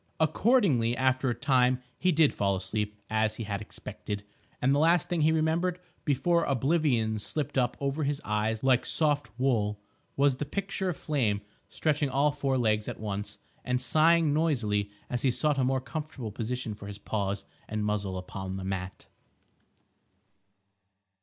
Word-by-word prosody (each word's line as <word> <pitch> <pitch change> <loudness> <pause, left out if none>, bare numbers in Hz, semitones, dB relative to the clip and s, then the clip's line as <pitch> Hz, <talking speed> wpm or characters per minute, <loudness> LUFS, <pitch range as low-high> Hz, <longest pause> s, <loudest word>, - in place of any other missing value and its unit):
Accordingly, 160 - +3
after 130 0 +2
a 120 - 0
time, 125 -1 +3 0.2
he 185 - +3
did 155 -2 +4
fall 100 -1 +1
asleep 105 +2 -3
as 110 0 +1
he 115 - -5
had 100 -1 -3
expected, 105 -1 -6 0.4
and 135 +2 +3
the 140 - +3
last 170 +3 +3
thing 175 -2 0
he 155 +1 +4
remembered, 165 +3 +1 0.3
before 165 +4 +2
oblivion 135 -6 +1
slipped 145 +6 -3
up 125 -2 +1
over 140 +2 -1
his 145 0 0
eyes 110 +1 -1
like 130 -2 +4
soft 145 -2 +1
wool, 105 -6 +1 0.4
was 140 -2 +3
the - - -2
picture 195 +3 -2
of 165 - -3
Flame 115 -10 0 0.3
stretching 150 -2 0
all 140 +3 +3
four 140 -2 0
legs 110 -3 +1
at - - -5
once, 105 -1 -4 0.3
and 125 0 0
sighing 155 +4 +4
noisily 115 -11 +1 0.2
as 125 -1 -2
he 135 - +3
sought 145 +3 +1
a - - +3
more 130 +1 +2
comfortable 140 -4 -6
position 115 +1 -3
for 100 -1 -10
his 100 0 -7
paws 100 -1 -2 0.2
and 105 -1 -2
muzzle 100 -3 -1
upon 95 +1 -5
the 95 - -5
mat. 95 -1 -4
130 Hz, 160 wpm, -29 LUFS, 105-150 Hz, 0.4 s, did